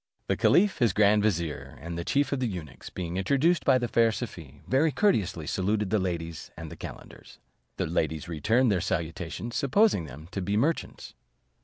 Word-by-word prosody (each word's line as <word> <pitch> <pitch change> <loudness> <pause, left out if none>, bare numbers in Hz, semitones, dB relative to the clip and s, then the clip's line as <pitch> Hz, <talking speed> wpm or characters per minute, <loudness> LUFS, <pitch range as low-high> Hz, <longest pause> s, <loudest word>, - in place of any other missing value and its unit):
The - - 0
caliph, 195 -1 +3
his 115 -7 +3
grand 105 +1 +4
vizier, 85 -7 -2
and 85 +1 -6
the 85 - -3
chief 140 +7 +1
of 140 - 0
the 125 - 0
eunuchs, 90 -8 -7
being 90 0 -4
introduced 140 - +2
by 130 - +5
the 120 -1 -1
fair 115 0 +3
Safie, 80 - -7
very 145 +4 +3
courteously 100 - +1
saluted 100 +4 -1
the 110 - +3
ladies 85 -3 -4
and 80 -2 -7
the - - -7
calenders. - - -11 0.4
The - - 0
ladies 80 -2 -1
returned 110 - +2
their 95 -4 +1
salutations, 85 +5 -3
supposing 140 - +3
them 75 +3 -10
to 95 - -3
be 100 +3 0
merchants. 155 +9 -1
100 Hz, 180 wpm, -28 LUFS, 85-125 Hz, 0.4 s, by